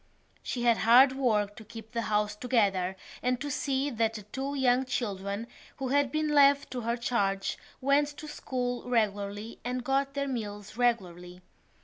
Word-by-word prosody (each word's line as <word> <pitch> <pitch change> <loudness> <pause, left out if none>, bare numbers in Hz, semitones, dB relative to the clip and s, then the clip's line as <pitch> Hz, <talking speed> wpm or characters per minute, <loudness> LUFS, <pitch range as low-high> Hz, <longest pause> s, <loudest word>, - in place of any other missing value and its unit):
She 240 - -3
had 235 -2 +4
hard 250 +4 +7
work 215 -6 0
to 220 - -9
keep 220 0 -11
the 230 - -1
house 210 -1 0
together 200 -6 +1 0.3
and 250 0 0
to 290 +2 -4
see 275 +1 -1
that 225 -1 0
the 210 - -6
two 270 +7 -4
young 260 -1 +3
children 205 -4 -3 0.3
who 265 -2 -3
had 285 -1 +2
been 310 +1 0
left 285 -1 +4
to 250 - -3
her 235 +1 -1
charge 200 -5 0 0.3
went 280 +2 +3
to 305 - -8
school 250 -4 -3
regularly 210 -1 -1
and 250 0 -3
got 275 +2 0
their 280 0 -1
meals 210 -5 -5
regularly. 180 -7 -1
240 Hz, 165 wpm, -29 LUFS, 210-265 Hz, 0.3 s, hard